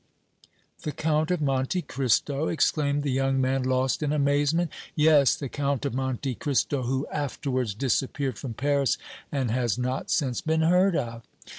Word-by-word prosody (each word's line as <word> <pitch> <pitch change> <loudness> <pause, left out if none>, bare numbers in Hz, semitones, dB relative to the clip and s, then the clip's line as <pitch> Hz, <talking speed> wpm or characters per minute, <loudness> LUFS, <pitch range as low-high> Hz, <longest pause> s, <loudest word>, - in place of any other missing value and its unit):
"The 150 - -3
Count 155 +2 0
of 180 -3 0
Monte 135 +6 0
Cristo?" 135 +3 0
exclaimed 145 -2 +1
the 140 - -1
young 135 +1 +1
man, 130 +1 +1
lost 130 +2 0
in 150 -1 0
amazement. 145 +3 +1 0.2
"Yes, 150 -3 +5
the 140 - -5
Count 140 0 -2
of 140 - -1
Monte 130 0 -2
Cristo, 140 +1 0
who 130 +3 -1
afterwards 130 -6 -2
disappeared 135 +2 -1
from 125 -5 -6
Paris 140 +1 +1 0.3
and 130 -5 -1
has 120 -2 0
not 125 +1 -2
since 130 -5 0
been 160 0 +1
heard 180 +3 +4
of." 115 -5 -3
140 Hz, 155 wpm, -26 LUFS, 130-150 Hz, 0.3 s, Yes